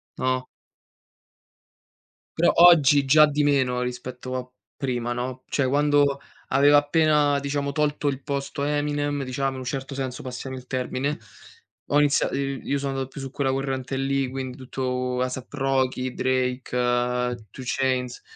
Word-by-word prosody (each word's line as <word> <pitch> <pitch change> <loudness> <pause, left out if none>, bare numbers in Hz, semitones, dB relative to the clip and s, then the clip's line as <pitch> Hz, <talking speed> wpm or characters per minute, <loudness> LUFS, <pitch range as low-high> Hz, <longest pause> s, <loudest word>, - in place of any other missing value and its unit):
no? 130 0 -1 1.9
Però - - +4
oggi 150 -5 +7
già 150 +3 +7
di 150 0 0
meno 130 -4 +2
rispetto 125 +1 -5
a 125 0 -4 0.3
prima, 120 -3 -2
no, 125 +1 -5
cioè 140 -3 +1
quando 145 0 +2 0.3
aveva 145 +2 +5
appena, 145 -1 +3
diciamo, 140 0 -2
tolto, 150 0 0
il 140 -1 -1
posto 140 -1 -3
a 145 - 0
Eminem, 145 -1 -1
diciamo, 135 +1 -2
in - - -7
un 130 - -6
certo 135 +2 -4
senso, 130 -2 -4
passami 130 +1 -6
il 130 -1 -9
termine, 130 +3 -2 0.7
ho 145 - +5
iniziato 145 -1 +2
i 140 -1 -2
io 140 - -1
sono 140 0 -2
andato 135 -1 -3
più 140 - -9
su 135 -1 -6
quella 135 -2 0
corrente 135 0 -2
lì, 135 0 0
quindi 130 -1 -5
tutto 125 -1 -3
Asap 130 0 -4
Rocky, 130 -2 0
Drake, 130 0 -1 0.8
Two 130 - -9
chains, 125 -1 -1
135 Hz, 150 wpm, -24 LUFS, 130-145 Hz, 1.9 s, oggi